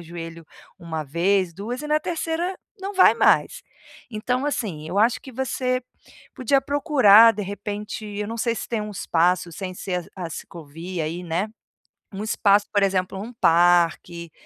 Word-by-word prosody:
o - - -9
joelho 165 -1 -9 0.3
1 160 -2 -5
vez, 175 +4 +1
2, 235 +7 -5
e 300 - -5
na 305 0 +3
3º 335 +3 -2 0.3
não 395 +1 -4
vai 370 - +6
mais. - - +2 0.5
Então 250 +5 -2
assim, 180 - -3
eu 190 +4 -2
acho 235 +3 +3
que 265 - -11
você 255 0 -1 0.5
podia 270 +2 +2
procurar, 260 -8 +6
de 210 0 -5
repente 205 +2 -6
eu 210 0 -5
não 230 - -5
sei 235 0 0
se - - -6
tem 230 -2 -1
um 210 - -6
espaço 180 -2 +1
sem 185 +2 -6
ser 180 -2 -4
a 180 - -5
a 165 - -9
ciclovia 165 +2 -7
aí, 170 +3 -4
né. 175 +6 -1 0.7
Um 200 +2 -5
espaço, 205 -1 +3
por 205 -1 +3
exemplo, 190 0 0
um 235 +3 -8
parque, 170 -2 +2
200 Hz, 170 wpm, -23 LUFS, 175-240 Hz, 0.7 s, vai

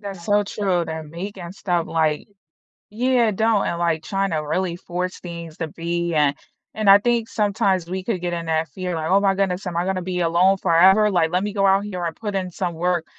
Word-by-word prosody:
That's 195 -4 -8
so 205 +1 +3
true, 190 -4 -1
they're 160 0 -5
making 175 +3 -7
stuff 175 -3 -1
like 155 -2 0 0.6
Yeah, 240 +1 +2
don't, 220 0 +1
and, 170 - -2
like, 165 -2 0
tryna 190 -5 -2
really 180 -1 -1
force 180 +1 -4
things 170 -2 -8
to 165 -2 -3
be 170 +1 -3
and 145 -2 +3 0.4
and 215 -2 -1
I 200 - +9
think 235 +1 0
sometimes 200 -4 0
we 185 0 -3
could 205 -7 -2
get 175 -1 -3
in 170 -1 -4
that 160 -1 0
fear 180 +4 -4
like, 160 0 -3
"Oh 195 - +5
my 195 -1 +2
goodness, 190 -1 -1
am 175 -2 -3
I 175 - +1
gonna 190 -1 -1
be 180 0 -3
alone 175 +3 +3
forever?" 190 +4 +5
Like, 170 -4 +2
"Let 180 +2 +1
me 210 - -3
go 195 -1 +2
out 195 +1 +4
here, 180 -4 -4
I 170 - 0
put 205 +1 -6
in 185 -1 -2
some 175 -1 -3
work." 175 0 0
180 Hz, 225 wpm, -22 LUFS, 170-195 Hz, 0.6 s, I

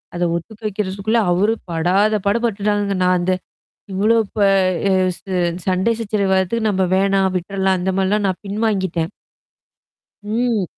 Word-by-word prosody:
அத 175 - -1
ஒத்துக்க 210 +6 -7
வைக்கிறதுக்குள்ள 205 +2 -1
அவரு 205 +6 +2 0.2
படாத 185 +6 +2
பட 205 +4 +3
பட்டுட்டாங்கங்க. 205 -2 0
நான் 180 0 +3
அந்த 185 +1 +1 0.6
இவ்ளோ 215 +4 +3 0.2
ப - - -4 0.5
அ - - +3 0.3
ச - - -25 0.5
சண்டை 190 +5 +2
சச்சரவு 205 -3 -1
வறத்துக்கு 215 +4 +1
நம்ம 190 -1 +1
வேணாம் 195 0 +2
விட்டுறலாம். 190 +1 0
அந்த 190 +2 0
மாரிலாம் 200 +2 +1
நான் 190 +1 -2
பின்வாங்கிட்டேன். 195 -5 -1 1.2
ம். 230 -2 +1
195 Hz, 135 wpm, -19 LUFS, 185-215 Hz, 1.2 s, பட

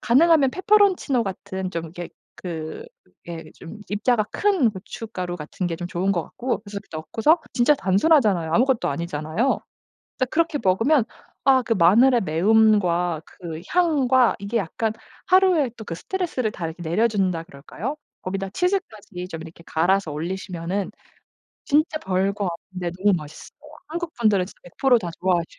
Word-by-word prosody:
가능하면 290 +2 +4
페페론치노 375 - +3
같은 190 -2 -5
좀 165 -2 -4
이렇게 175 +2 -7 0.3
그 165 - -6 0.4
예 165 -1 -6
좀 175 +6 -11
입자가 215 +1 +1
큰 380 - +2
고춧가루 190 -2 -6
같은 170 +3 -4
게 165 - -3
좀 175 - -5
좋은 185 +2 0
것 170 - 0
같고 250 +1 -3
그래서 200 -1 -7
넣고서 220 - +2
진짜 250 +4 +4
단순하잖아요. 200 - +3
아무것도 255 +3 +2
아니잖아요. 155 - -1 0.6
근데 255 - +1
그렇게 330 -2 +1
먹으면 225 +8 +3 0.4
아 265 -2 +5
그 230 - -2
마늘의 230 +8 +5
매움과 180 -2 +3
그 165 -3 -8
향과 270 -9 +3
이게 200 +4 -3
약간 215 +3 -2 0.3
하루에 365 -8 +4
또 220 - -9
그 170 - -5
스트레스를 290 - -2
다 175 -5 -5
이렇게 165 +2 -7
내려준다 185 -1 +1
그럴까요? 175 - -6 0.3
거기다 195 +1 -3
치즈까지 215 - -2
좀 160 - -6
이렇게 165 0 -12
갈아서 175 +2 +1
올리시면은 180 +3 -3 0.7
진짜 310 +2 +2
별거 195 +2 0 0.3
없는데 180 -2 -3
너무 205 -3 +4
맛있어요. 150 -1 -10 0.3
한국 335 +1 -4
분들은 205 -5 +3
진짜 - - -15
100% 245 +8 +2
다 170 - -3
좋아하지. 175 -2 0
200 Hz, 345 characters per minute, -23 LUFS, 175-260 Hz, 0.7 s, 아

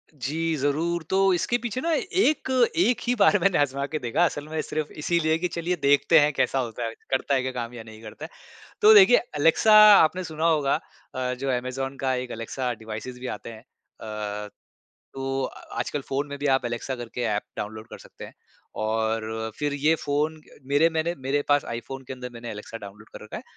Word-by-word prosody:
जी 160 +5 -2
ज़रूर। 160 +5 0
तो 195 0 +3
इसके 190 +7 +1
पीछे 240 +1 -4
ना 335 - -1
एक 335 -4 +1 0.3
एक 250 -9 +3
ही 245 - +2
बार 200 +1 +6
मैंने 190 +1 +2
आज़मा 140 -1 0
के 155 +1 -3
देखा। 120 +7 +1
असल 145 -3 -3
में 160 0 -2
सिर्फ़ 155 -1 -4
इसीलिए 160 0 +1
कि 180 +2 -1
चलिए 170 +1 -2
देखते 145 +3 +5
हैं 145 0 +3
कैसा 135 - +1
होता 120 -1 -4
है, 115 - -4 0.2
करता 135 +1 +1
है 130 - +2
क्या 130 +1 -3
काम 120 -1 -5
या 120 -2 -8
नहीं 110 0 -13
करता 115 +7 -9
है। - - -10 0.5
तो 430 +1 +9
देखिए 380 -12 +8 0.2
एलेक्सा 165 +8 +4 0.2
आपने 180 +3 +3
सुना 160 -1 -4
होगा 150 -4 +2 0.3
अ, 125 -1 -2
जो 135 +2 -3
अमेज़न 130 +2 -3
का 130 -1 +1
एक 125 0 -4
एलेक्सा 125 +3 -3
डिवाइसेज़ 110 +3 -7
भी 130 - -5
आते 115 - -6
हैं। 110 -1 -11 0.4
अ, 105 -1 -5 0.7
तो 135 0 -2
अ - - -6 0.2
आजकल 145 - -2
फ़ोन 140 +2 -1
में 140 0 -6
भी 145 - -4
आप 135 -2 +2
एलेक्सा 120 +2 -3
करके 120 0 -6
एप 105 - -2
डाउनलोड 110 +1 -6
कर - - -9
सकते - - -12
हैं। - - -13 0.5
और 110 0 -2
फिर 145 -1 -1
ये 150 +3 +2
फ़ोन 150 +2 -1 0.2
मेरे 145 +4 +3
मैंने 160 +1 -1
मेरे 145 +2 +1
पास 145 0 +4
iPhone 130 +3 -6
के - - -5
अंदर 125 -1 -7
मैंने 120 0 -8
एलेक्सा 105 +2 -8
डाउनलोड 105 0 -12
कर - - -9
रखा 105 - -7
है। - - -9
140 Hz, 205 wpm, -25 LUFS, 120-160 Hz, 0.7 s, तो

